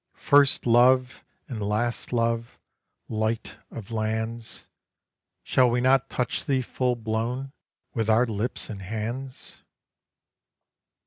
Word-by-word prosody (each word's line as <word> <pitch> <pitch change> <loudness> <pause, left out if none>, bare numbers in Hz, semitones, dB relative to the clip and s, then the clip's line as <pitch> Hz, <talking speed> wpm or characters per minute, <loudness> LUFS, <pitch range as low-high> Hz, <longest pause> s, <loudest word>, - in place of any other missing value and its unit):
First 140 -1 +4
love 125 +2 +4 0.2
and 115 -5 -5
last 110 +4 -1
love, 115 -1 -1 0.5
light 110 +1 -2
of 115 -1 -9
lands, 110 +1 -3 0.8
Shall 130 -1 +3
we 120 +1 +1
not 130 +1 +3
touch 125 - -2
thee 135 -4 +1
full 125 0 -1
blown 120 +4 -3 0.4
with 115 -3 -1
our 115 +3 +5
lips 110 +1 -3
and 100 -3 -7
hands? 115 +6 -6
115 Hz, 110 wpm, -26 LUFS, 110-125 Hz, 0.8 s, our